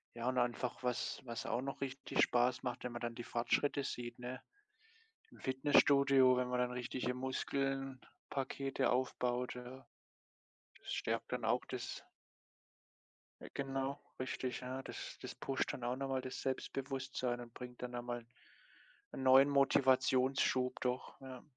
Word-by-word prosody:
Ja, 120 +1 -1
und 130 - -1
einfach 120 +1 0
was 125 +2 -1
was 115 -2 -4
auch 120 - 0
noch 140 +1 -5
richtig 135 0 -1
Spaß 125 +2 +3
macht, 125 -1 -3
wenn 125 - -3
man 120 - -5
dann 120 -1 -3
die 120 - -5
Fortschritte 140 +5 +1
sieht, 120 -2 -4
ne? 125 +1 -5 0.9
Im - - -16
Fitnessstudio, 135 -1 +5
wenn 125 0 +1
man 125 0 0
dann 125 0 +1
richtige 125 0 -2
Muskelpakete 135 +1 -2
aufbaut, 125 -1 0
ja? 125 +1 -9 0.9
Das - - -6
stärkt - - -1
dann - - -1
auch - - +2
das - - -5 1.4
Äh, - - -8
genau, 135 0 -2 0.2
richtig. 130 0 -2
Ja, 130 +1 -4
das - - -7
das - - -6
pusht 135 -1 -1
dann 125 - -6
auch 120 +1 0
noch 135 +1 -3
mal 130 -1 0
das 130 0 -5
Selbstbewusstsein 130 -2 -2
und 120 -1 -10
bringt 125 0 -9
dann 125 0 -4
einmal 120 -1 -4 0.9
'n 135 - -4
neuen 135 +2 +8
Motivationsschub 130 -1 +3
doch, 125 0 -2
ja. 130 -2 -8
130 Hz, 145 wpm, -37 LUFS, 125-135 Hz, 1.4 s, neuen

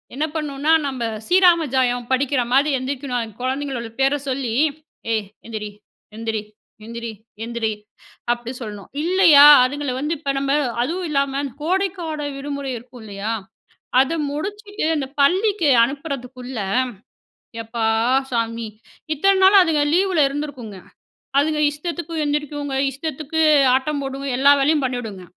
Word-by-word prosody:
என்ன 305 +3 0
பண்ணுன்னா, 300 0 -1 0.2
நம்ப 260 -3 -4 0.2
ஸ்ரீராம 355 -3 +5
ஜயம் 245 -2 +1
படிக்கிற 260 0 +1
மாரி 280 +3 +4
எந்திரிக்கணும். 260 -1 -3
அந்த 220 -2 -8
கொழந்தைங்களோட 260 -3 -3
பேர 270 +1 +3 0.2
சொல்லி 255 -3 -2 0.6
"ஏய் 215 -2 -1 0.2
எந்திரி 215 -2 -5 0.5
எந்திரி 225 -1 -3 0.4
எந்திரி 235 0 -6 0.3
எந்திரி" 235 -2 -2 0.6
அப்படி 240 0 -7
சொல்லணும். 210 -3 -8
இல்லையா, 340 -5 +7 0.2
அதுங்கள 285 -1 -3
வந்து 305 +4 -1
இப்ப 280 -3 -2
நம்ப 275 0 0 0.3
அதுவும் 345 +5 -3
இல்லாம 280 -1 0 0.2
கோடைக்கால 340 -4 -2
விடுமுறை 280 -1 -4
இருக்கும் 245 0 -13
இல்லையா? 205 +2 -4 0.7
அத 270 +5 +2 0.2
முடிச்சுட்டு 410 +5 -5
அந்த 275 -2 -2
பள்ளிக்கு 365 +1 +3
அனுப்புறதுக்குள்ள, 260 -3 -6 1.0
எப்பா! 225 0 -3 0.5
சாமி! 230 -1 -1 0.5
இத்தன 390 +6 +3
நாளா 390 0 +8
அதுங்க 305 -3 +1
லீவுல 370 -4 +3
இருந்திருக்குங்க. 275 -8 -6 0.6
அதுங்க 305 +1 0
இஷ்டத்துக்கு 335 +2 -5
எந்திரிக்குங்க, 290 -1 -2 0.2
இஷ்டத்துக்கு 310 +2 -3 0.3
ஆட்டம் 280 +2 -1
போடுங்க, 270 +1 -5
எல்லா 280 +2 +6
வேலையும் 295 +1 +2
பண்ணீடுங்க. 225 -7 -4
275 Hz, 120 wpm, -21 LUFS, 245-310 Hz, 1.0 s, நாளா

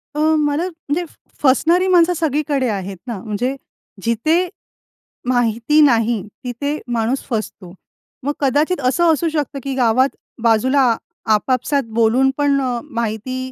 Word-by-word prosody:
अ, - - -2 0.2
मला, 295 +2 +1
म्हणजे 330 -1 -3 0.4
फसणारी 335 +7 +3
माणसं 355 -1 +4
सगळीकडे 295 -4 0
आहेत 195 -2 -4
ना, 235 -3 -4
म्हणजे 235 +5 -2 0.5
जिथे 310 +11 +1 0.8
माहिती 245 +4 +2
नाही, 235 -5 +3 0.2
तिथे 285 +4 -3 0.2
माणूस 235 +3 0
फसतो. 215 -6 -4 0.5
मग 290 +2 -1
कदाचित 290 +5 +1
असं 325 +6 +3
असू 330 +2 0
शकतं, 295 -3 -3
की 275 - -3
गावात 255 +1 +3 0.3
बाजूला 240 +2 +3 0.4
आपापसात 255 +5 +1 0.2
बोलून 240 +4 +4
पण 285 -1 +2
अ, 250 -2 -1
माहिती 255 0 -4
260 Hz, 125 wpm, -19 LUFS, 230-300 Hz, 0.8 s, माणसं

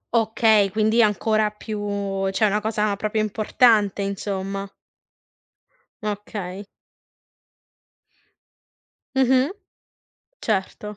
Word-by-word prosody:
Okay, 220 -2 +3
quindi 220 +3 +2
ancora 215 +1 +2
più 200 -2 -3
cioè 215 +3 +1
una 210 +1 +1
cosa 210 -1 0
proprio 215 +2 -2
importante, 215 -1 +2
insomma. 195 0 -4 1.3
Okay. 205 -2 -5 2.5
Mh-mh. 265 +3 +3 0.9
Certo. 210 0 -2
210 Hz, 70 wpm, -23 LUFS, 200-220 Hz, 2.5 s, Okay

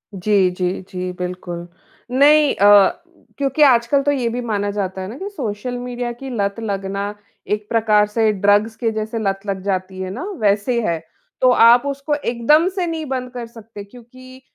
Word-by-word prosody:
जी, 195 0 +2
जी, 180 0 -1 0.2
जी। 180 0 -4
बिल्कुल, 180 -1 -5 0.4
नहीं 290 +2 +5
अ, 205 - +5 0.4
क्योंकि 275 +1 -1
आजकल 255 0 +4
तो 290 - +2
ये 255 -4 -1
भी 245 +2 -3
माना 205 -4 -2
जाता 190 -2 -3
है 185 - -5
ना 225 +6 -8
कि 390 +6 -5
सोशल 245 - -4
मीडिया 245 0 -4
की 265 +3 -9
लत 200 -3 -2
लगना 200 -1 -3 0.4
एक 210 0 -4
प्रकार 215 -2 +3
से 220 +1 +1
ड्रग्स 205 +3 +2
के 230 -1 -1
जैसे 220 +1 -4
लत 195 -2 -1
लग 195 -2 -3
जाती 190 -1 -3
है 185 - -4
ना 240 - -6 0.2
वैसे 210 +4 +1
है। 165 -1 -1 0.4
तो 255 - +5
आप 240 +1 +6
उसको 280 +1 -2
एकदम 290 +5 +2
से 370 -3 -1
नहीं 320 -1 -4
बंद 255 -2 -4
कर 245 -1 -6
सकते, 225 -2 -11
क्योंकि 255 +4 -15
225 Hz, 180 wpm, -19 LUFS, 200-255 Hz, 0.4 s, आप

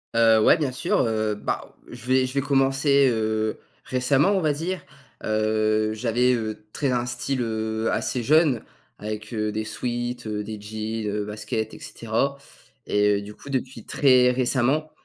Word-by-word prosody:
Heu, 115 -1 +5
ouais, 170 - +6
bien 145 -4 -1
sûr, 125 - 0
heu, 110 -2 0
bah, - - -4
je 120 -1 -10
vais 130 0 +3
je 130 - -5
vais 140 - +1
commencer, 135 0 +3
heu, 110 -1 -1 0.2
récemment, 135 +6 +2
on 195 - +2
va 155 -3 +2
dire, 175 +5 -3 0.4
heu, 110 0 +1
j'avais, 120 +3 +2
heu, 110 -2 -3
très 140 -3 0
un 120 -1 0
style, 125 +2 -2
heu, 110 0 -1
assez 125 - -1
jeune 150 -3 +3 0.3
avec, 110 0 -6
heu, 105 -1 -1
des 110 +1 -3
sweats, 120 +2 -3
heu, 105 -1 -3
des 110 -1 -6
jeans, 110 +1 -4
heu, 105 -1 -2
baskets 110 +1 -4
et - - -12
cetera. 120 +5 -2 0.5
Et 105 0 +3
heu, - - -3
du 105 +1 -10
coup, 140 - -12
depuis 130 -3 -3
très 130 -3 +4
récemment, 130 +4 +1
115 Hz, 170 wpm, -24 LUFS, 110-130 Hz, 0.5 s, ouais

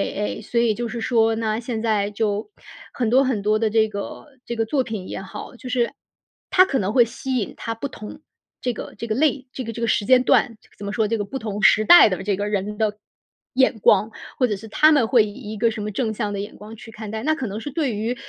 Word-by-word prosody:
哎 205 - -3 0.2
哎。 - - -9
所 235 - -1
以 225 -2 +2
就 240 +1 -3
是 230 +1 -5
说 225 -2 +2
呢， 220 0 -1
现 230 -2 -4
在 210 -3 0
就 210 - -2 0.4
很 240 -3 -1
多 260 +3 +5
很 255 -6 0
多 215 +1 +2
的 220 -1 +1
这 220 0 +3
个 200 +6 -7 0.2
这 235 - -4
个 225 -1 0
作 260 +3 0
品 215 -6 -6
也 - - -5
好， 195 +5 -9
就 250 +1 -9
是 245 -1 +1 0.6
它 370 0 +6
可 275 - -1
能 200 -1 -1
会 245 - +6
吸 255 +3 -4
引 210 - -3
它 230 - -4
不 255 +5 -5
同 240 +3 -10 0.4
这 245 -1 -1
个 - - -8
这 230 - -5
个 215 - -1
类 280 -1 +1
这 260 - -5
个 230 -1 -6
这 235 - -7
个 230 - 0
时 210 - +1
间 255 +1 +5
段。 230 -4 +2 0.2
怎 200 - -8
么 200 - -4
说， 215 0 +1
这 230 - 0
个 205 - -3
不 265 +7 -5
同 210 -2 -4
时 215 - +6
代 345 -2 +8
的 185 0 -3
这 200 -1 0
个 205 +2 -3
人 210 0 -2
的 210 -1 0 0.6
眼 260 -3 +2
光。 210 +2 +4 0.3
或 255 - +3
者 210 - -1
是 200 +3 -10
他 305 +8 +4
们 275 -7 +4
会 235 -3 +4
以 205 - -8 0.2
一 215 - -6
个 230 +1 +2
什 215 - -6
么 210 - -3
正 220 +1 -1
向 210 -1 -3
的 200 - -3
眼 205 +1 -6
光 215 +2 -11
去 225 +1 -12
看 215 -1 -8
待。 220 +2 -5
那 310 +1 +2
可 265 -7 -3
能 205 +2 -5
是 290 +5 -6
对 275 -7 -1
于 225 +4 -2
225 Hz, 290 characters per minute, -22 LUFS, 210-245 Hz, 0.6 s, 代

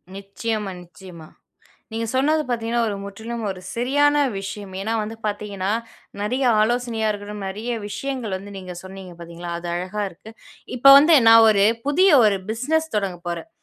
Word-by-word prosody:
நிச்சயமா, 200 +1 -4
நிச்சயமா. 175 -2 -13 0.6
நீங்க 225 +1 -3
சொன்னது 300 +4 +2
பாத்தீங்கன்னா 235 0 -1
ஒரு 205 - -3
முற்றிலும் 220 +3 -7
ஒரு 185 -1 -5 0.2
சரியான 290 +5 +2 0.2
விஷயம். 195 0 -7
ஏன்னா 220 +3 -2
வந்து 215 +2 -5
பாத்தீங்கன்னா, 205 -2 -3 0.5
நெறைய 255 +6 -1 0.2
ஆலோசனையா 230 -1 0
இருக்கட்டும், 205 -1 -7
நெறைய 215 +5 -5 0.2
விஷயங்கள் 250 -3 -4
வந்து 200 +1 -11
நீங்க 185 -2 -8
சொன்னீங்க 190 -1 -10
பாத்தீங்களா! 170 +1 -8
அது 175 - -6
அழகா 185 +4 -3
இருக்கு. 210 +6 -14 0.5
இப்ப 275 +3 +8
வந்து 305 +3 +6
நான் 225 0 +8
ஒரு 200 -1 +4 0.2
புதிய 370 +7 +4 0.2
ஒரு 200 -2 +3
பிசினஸ் 315 +7 -1
தொடங்கப் 185 -4 -3
போறேன். 170 -1 -5
210 Hz, 150 wpm, -22 LUFS, 195-240 Hz, 0.6 s, இப்ப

